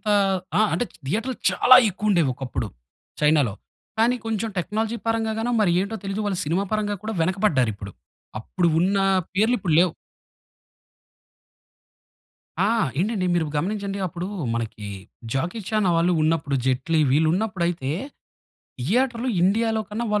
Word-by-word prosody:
అంత - - -27 0.5
ఆ! - - +4
అంటే 245 - 0
చ్ - - -19
థియేటర్లు 225 - -1
చాలా 255 - +7
ఎక్కువుండేవి 190 -6 +1
ఒకప్పుడు 125 -4 -4 0.5
చైనాలో. 150 -8 +3 0.4
కానీ 240 +3 +3
కొంచెం 225 0 -2
టెక్నాలజీ 220 +5 -2
పరంగా 225 -1 0
గానో 240 +2 -1
మరి 190 -5 +3
ఏంటో 210 +3 -3
తెలీదు 195 +2 -3
వాళ్ళు 195 -3 -1
సినిమా 175 +6 0
పరంగా 210 -1 0
కూడా 220 +1 -3
వెనకపడ్డారిప్పుడు. 130 - 0 0.5
అప్పుడు 175 +9 0
ఉన్న 195 +2 +2 0.4
పేర్లు 220 +5 +3
ఇప్పుడు 170 -6 0
లేవు. 180 -3 +2 2.7
ఆ! 200 +3 +3 0.3
ఏంటండి 195 -2 0
మీరు 165 -2 +1
గమనించండి. 200 +4 -2
అప్పుడు 175 +1 -5 0.3
మనకి 110 -3 -4 0.5
జాకీ 170 +11 -2
చానా 215 -4 +2
వాళ్ళు 175 +2 +2
ఉన్నప్పుడు 155 -3 +1
జైట్లీ 130 +5 +1
వీళ్ళు 155 +3 +3
ఉన్నప్పుడయితే 175 -8 -1 0.9
థియేటర్‌లో 240 - 0
ఇండియాలో 220 +3 +2
కన్నా 230 +3 -3
195 Hz, 130 wpm, -23 LUFS, 160-220 Hz, 2.7 s, చాలా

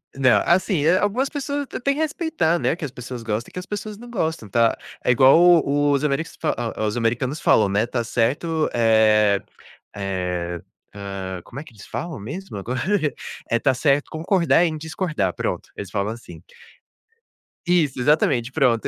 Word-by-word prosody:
não, 130 -2 +4
assim, 175 -3 +2
algumas 235 +7 +1
pessoas 285 -1 -3 0.2
têm 280 0 +2
que - - -5
respeitar, 300 - 0
né, - - +1
que 165 - -5
as 130 - -6
pessoas 125 -1 -8
gostam 110 +1 -3
e - - -25
que 180 - -4
as 180 - -8
pessoas 210 0 -6
não 240 +1 -12
gostam, 160 - -2
tá. 115 +2 +2 0.3
É - - +3
igual 130 +5 +6 0.3
o 145 +1 +2
os 140 +1 +1
ameris 150 +2 -2
fa - - 0 0.3
os 105 - -1
americanos 120 +5 -1
falam, 105 -2 +4
né, 105 +3 +2
está 120 0 -2
certo, 150 +8 0
eh 110 -3 +4 0.5
eh 90 -3 -3 0.3
ah, 95 -2 -6
como 135 - -9
é - - -7
que 155 - -16
eles 100 - -13
falam 170 -9 -5
mesmo? 140 - -7
Agora 125 +6 -3 0.7
eh: 115 - +3
"Tá 135 0 +2
certo 140 +2 +1
concordar 170 +1 +2
em 155 -2 -2
discordar". 160 - -2
Pronto, - - -3
eles 100 - -7
falam 105 +1 -1
assim. 115 - -12 1.2
Isso, 160 -7 +1
exatamente, 130 -3 +2
pronto. 125 -6 +2
135 Hz, 170 wpm, -22 LUFS, 110-165 Hz, 1.2 s, igual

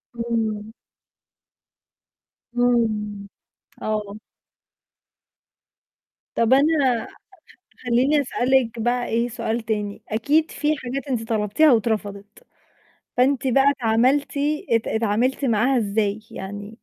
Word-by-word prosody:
إمم. 225 -2 -2 1.8
إمم، 215 -4 0 0.5
آه. 210 -1 -3 2.2
طَب 230 +2 +3
أنا 275 -4 +2 0.8
خليني 255 +5 +2
أسألِك 250 -3 +1
بقى 240 +2 0
إيه 235 +2 0
سؤال 230 0 -2
تاني، 210 -2 -3
أكيد 290 +9 +1
في 300 +1 0
حاجات 265 +1 -5
أنتِ 230 -4 -3
طلبتيها 220 +8 +3
واترفضت، 210 - -2 0.7
فأنتِ 265 +1 +2
بقى 270 +2 +4
اتعملتِ 255 +2 +1 0.5
اتعاملتِ 230 +5 0
معاها 245 +3 +2
إزاي 210 -1 0
يعني؟ 205 +2 -7
230 Hz, 85 wpm, -22 LUFS, 215-260 Hz, 2.2 s, بقى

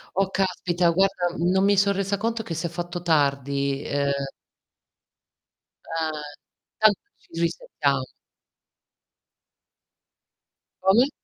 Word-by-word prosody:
Oh, 195 0 +2
caspita! 180 -2 +1
Guarda, 180 -1 +1
mhmm, 175 +2 +1
no 190 0 +3
mi 200 +1 +4
so' 200 +1 +4
resa 200 +1 -1
conto 225 +2 -1
che 165 - -5
s'è 165 +2 -2
fatto 175 +1 -5
tardi, 140 -3 +1
uhm 140 0 0 1.9
Ah, 160 -1 0
e 150 -1 -12
tanto 215 -2 +5 0.2
ci - - -29
risetam 140 -5 0 2.8
Come? 240 +8 +6
175 Hz, 105 wpm, -25 LUFS, 150-195 Hz, 2.8 s, Come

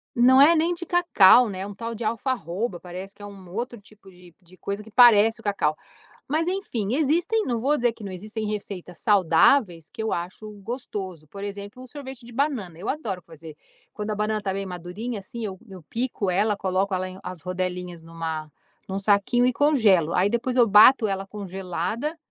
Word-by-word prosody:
Não 260 +3 +6
é 330 +4 +7
nem 330 +2 +2
de 345 0 -6
cacau, 250 - +6
né. 190 0 -5
"Um 205 - -7
tal 230 +3 -6
de 225 - -6
alfarroba" 220 -4 -2
parece 185 +2 -9
que 205 - -18
é - - -7
um, 195 -3 -12
outro 235 +3 -5
tipo 205 -1 -19
de 180 -2 -18
de 180 +1 -20
coisa 200 +1 -5
que 220 - -15
parece 225 -2 +6
o - - -15
cacau. 195 -7 0 0.6
Mas 315 +3 0
enfim, 255 - -2
existem, 345 +9 +1
não 240 -3 -1
vou 285 +6 +1
dizer 240 -2 +1
que 215 - -12
não 195 - -6
existem 215 +3 -5
receitas 200 -4 -6
saudáveis 180 - +3
que - - -10
eu 220 - -2
acho 180 +5 -5
gostoso. 190 - -6
Por 200 +6 -10
exemplo, 205 +4 -7
o 255 - -12
sorvete 265 -3 -9
de 240 - -12
banana. 230 - -2
Eu 190 - -6
adoro 215 -11 -3
fazer, 160 -1 -12 0.4
quando 210 +1 -5
a - - 0
banana 210 +1 -1
tá 195 -1 -2
bem 195 +1 -3
madurinha, 190 +6 -6
assim, 230 +3 -7
eu 190 -3 -5
eu 185 -3 -11
pico 225 -1 -2
ela, 205 +3 +1
coloco 190 0 -1
ela 185 0 -2
em 185 +1 -10
as 180 -3 -8
rodelinhas 180 -1 -4
numa 165 -2 -5 0.4
num 190 +1 -3
saquinho 205 +5 +2
e 255 - +2
congelo. 220 - +3
Aí 195 +3 +3
depois 240 +2 -1
eu 240 -2 +6
bato 220 +3 +7
ela 195 0 -3
congelada, 195 - -4
205 Hz, 200 wpm, -24 LUFS, 185-240 Hz, 0.6 s, é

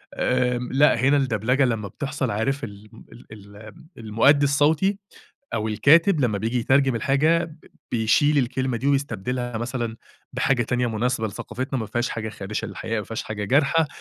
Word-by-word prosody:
آمم، 125 -1 0
لأ، 135 -3 +4
هنا 140 +3 +4
الدبلجة 125 +1 +1
لمّا 110 -4 -2
بتحصل، 135 +2 -3
عارِف 135 +7 -1
الم 105 0 -10
ال - - -14
الم 105 +5 -13
المؤدِّي 115 +6 +3
الصوتي 155 +7 +2 0.6
أو 110 0 -1
الكاتب 155 - +4
لمّا 110 -5 +1
بييجي 115 +4 -1
يترجم 130 +1 +2
الحاجة، 145 +8 +2
ب 160 -1 -14 0.3
بيشيل 125 +6 +2
الكلمة 130 -1 0
دي 130 +5 -3
ويستبدِلها 125 -3 -1
مثلًا 120 -1 -3 0.4
بحاجة 125 -3 +1
تانية 125 +2 -1
مناسِبة 115 0 -1
لثقافتنا، 130 +5 -5
ما 110 - -3
فيهاش 120 +4 -2
حاجة 110 -1 -4
خادشة 105 +1 -5
للحياء، 110 +3 -4
ما - - -4
فيهاش 115 - -5
حاجة 105 -1 -5
جارحة. 145 +6 +2
125 Hz, 160 wpm, -23 LUFS, 110-140 Hz, 0.6 s, لأ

